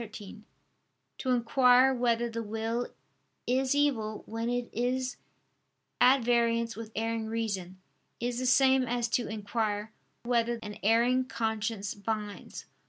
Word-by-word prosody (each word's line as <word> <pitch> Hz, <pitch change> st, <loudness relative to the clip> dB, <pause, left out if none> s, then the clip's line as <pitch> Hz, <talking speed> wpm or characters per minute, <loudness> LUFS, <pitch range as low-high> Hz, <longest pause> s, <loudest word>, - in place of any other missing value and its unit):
13), 215 Hz, -1 st, -10 dB, 0.7 s
to 260 Hz, -, -3 dB
inquire 250 Hz, +1 st, +5 dB
whether 240 Hz, -1 st, +1 dB
the 230 Hz, 0 st, -4 dB
will 225 Hz, +2 st, -2 dB, 0.6 s
is 260 Hz, +2 st, +1 dB
evil 230 Hz, -8 st, 0 dB
when 225 Hz, +1 st, -3 dB
it 245 Hz, 0 st, -1 dB
is 255 Hz, +2 st, -1 dB, 0.8 s
at 255 Hz, +1 st, +5 dB
variance 235 Hz, -1 st, +1 dB
with 225 Hz, 0 st, -8 dB
erring 225 Hz, 0 st, -2 dB
reason, 200 Hz, -5 st, -3 dB, 0.4 s
is 240 Hz, 0 st, -2 dB
the 255 Hz, -, -1 dB
same 265 Hz, +1 st, +5 dB
as 240 Hz, 0 st, 0 dB
to 235 Hz, +1 st, 0 dB
inquire 215 Hz, 0 st, -2 dB, 0.3 s
"whether 235 Hz, -1 st, +1 dB
an 210 Hz, -1 st, -8 dB
erring 235 Hz, +4 st, +3 dB
conscience 220 Hz, -3 st, -2 dB
binds." 210 Hz, 0 st, -5 dB
230 Hz, 125 wpm, -29 LUFS, 220-245 Hz, 0.8 s, inquire